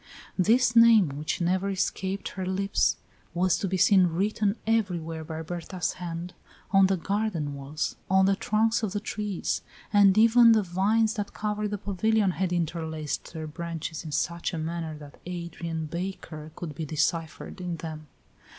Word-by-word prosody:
This 230 +5 +3
name, 230 -7 +7
which 150 +5 -3
never 185 +3 +1
escaped 190 0 -2
her 190 - -5
lips, 195 +2 +1 0.4
was 180 0 +3
to 195 - -1
be 190 0 -1
seen 185 0 +5
written 200 +4 0
everywhere 175 -8 -1
by 160 0 -6
Berta's 175 +1 -3
hand, 175 0 -6 0.4
on 195 -1 +6
the 190 0 +1
garden 185 -5 -1
walls, 140 +3 -4
on 190 0 +5
the 195 0 +3
trunks 220 +3 +1
of 210 -4 -2
the 205 - -1
trees; 210 -3 -3 0.3
and 200 -1 +6
even 230 +1 +7
the 215 -2 +3
vines 210 +5 +2
that 205 -3 -4
covered 210 0 -1
the 205 - -2
pavilion 205 +1 +1
had 180 +1 -2
interlaced 160 -3 -3
their 160 -1 -5
branches 165 0 -5
in 155 - -7
such 170 +3 -1
a - - -3
manner 160 -1 -4
that 145 -1 -13
"Adrian 170 -2 -4
Baker" 165 -2 -6
could 165 -4 -6
be 160 - -5
deciphered 160 +4 -2
in 175 -2 -3
them. 155 -1 -7
180 Hz, 160 wpm, -27 LUFS, 165-205 Hz, 0.4 s, name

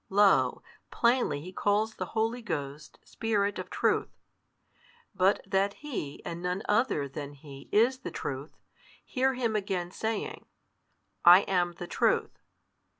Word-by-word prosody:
Lo, 190 -11 +4 0.3
plainly 235 - +1
He 180 +4 -9
calls 210 +3 +1
the - - -5
Holy 225 +3 0
Ghost 150 -8 -5
Spirit 205 -3 -1
of - - -6
Truth. - - +1 1.0
But 190 +2 +3
that 195 +1 +1
He 235 - -6
and 170 0 -5
none 180 +3 -2
other 210 - +1
than 140 +1 -7
He 140 -1 -12
is 240 +5 +3
the 265 - -6
Truth, 140 +2 -6 0.5
hear 265 0 +1
Him 235 -3 -1
again 190 -4 -2
saying, 220 +1 -4 0.8
I 175 +2 +9
am 180 -3 0
the 175 - -7
Truth. - - 0
195 Hz, 135 wpm, -29 LUFS, 160-225 Hz, 1.0 s, I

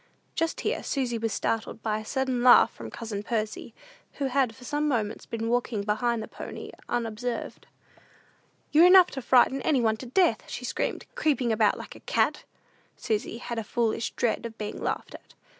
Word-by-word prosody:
Just 330 -1 -1
here - - -1
Susy 245 -4 -1
was 225 0 -1
startled 220 +2 -2
by 215 -1 0
a 215 - -9
sudden 260 0 -1
laugh 245 0 +7
from 115 -1 -8
cousin 215 - -5
Percy, 215 0 -3 0.4
who 280 - -3
had 265 -3 +1
for 260 - -15
some 295 +4 -1
moments 225 -6 -2
been 225 0 -3
walking 235 -3 0
behind 220 +2 0
the - - -7
pony - - -8 0.2
unobserved. 235 +1 -3 1.0
"You're 325 +4 +7
enough 365 -1 +8
to 265 - -5
frighten 260 +2 +4
any 295 -5 +2
one 220 -2 +2
to 255 - -8
death," 355 +9 +2
she - - -5
screamed, - - -2
"creeping 270 -6 +1
about 215 -2 +3
like - - -9
a - - -12
cat." - - 0 0.5
Susy 220 +1 -2
had 235 -1 -4
a - - -3
foolish 230 0 -1
dread 235 0 0
of 225 -1 -14
being 210 -1 -5
laughed - - -3
at. - - -14
235 Hz, 180 wpm, -27 LUFS, 220-260 Hz, 1.0 s, enough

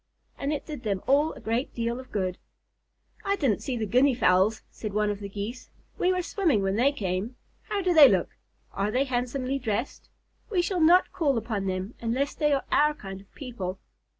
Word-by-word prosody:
And 280 - -3
it 295 - -3
did 300 -5 -7
them 200 -4 -2
all 290 +4 +3
a - - -11
great 230 +4 -2
deal 235 +1 -2
of 260 - -12
good. 185 -3 -2 0.8
"I 395 0 +1
didn't 270 - 0
see 255 -3 -3
the 220 - -1
Guinea 255 +5 +3
Fowls," 195 0 +3
said 215 -3 -6
one 210 0 +1
of 205 - -5
the 200 -1 -6
Geese. 210 +6 -6 0.3
"We 360 - +3
were 365 -1 0
swimming 320 - +1
when 195 0 0
they 255 +6 +3
came. 200 -1 -3 0.3
How 405 -2 -1
do 360 -1 +2
they 300 -5 +9
look? 190 -4 0 0.4
Are 200 +1 -1
they 255 +5 +2
handsomely 255 +1 -2
dressed? 230 0 -3 0.4
We 370 -5 +1
shall 360 -1 -1
not 350 +4 +5
call 285 -7 +1
upon 215 -3 -2
them 185 +4 -3
unless 250 +5 -1
they 295 -1 +1
are 275 -1 +1
our 300 +1 +4
kind 195 -6 -8
of 195 - -22
people." 200 -9 -5
245 Hz, 205 wpm, -27 LUFS, 205-285 Hz, 0.8 s, they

